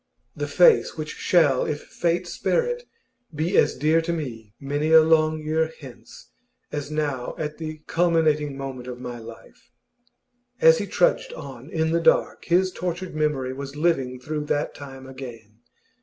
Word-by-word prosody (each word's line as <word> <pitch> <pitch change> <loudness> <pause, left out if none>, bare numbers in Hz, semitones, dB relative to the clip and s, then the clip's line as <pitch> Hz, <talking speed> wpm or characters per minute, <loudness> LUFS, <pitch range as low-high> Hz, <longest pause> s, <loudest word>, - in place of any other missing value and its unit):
The - - -3
face 475 - +4
which 155 -1 -4
shall, 150 -7 +3
if 150 -1 -3
fate 170 0 -1
spare 480 - 0
it, 485 0 -4 0.5
be 160 +6 -1
as - - +4
dear 160 +2 +3
to 165 +1 -2
me 115 -10 -6
many 145 +3 -1
a 160 0 +9
long 155 -1 +3
year 160 +1 0
hence 130 -5 -13 0.4
as 145 -1 -4
now 145 -5 -2
at 150 0 -4
the 155 -1 -6
culminating 155 -4 +1
moment 135 -2 -6
of 125 -1 -7
my 120 -1 -6
life! 115 +1 -13 0.9
As 485 0 +6
he - - -3
trudged - - +1
on - - -9
in 160 0 0
the 170 0 +2
dark, - - +2
his 185 +2 +3
tortured 180 0 -4
memory 150 -4 -1
was 140 +1 -7
living 135 -6 0
through 150 +3 -4
that 145 0 -1
time 135 -2 -10
again. 120 -5 -10
150 Hz, 160 wpm, -24 LUFS, 135-165 Hz, 0.9 s, a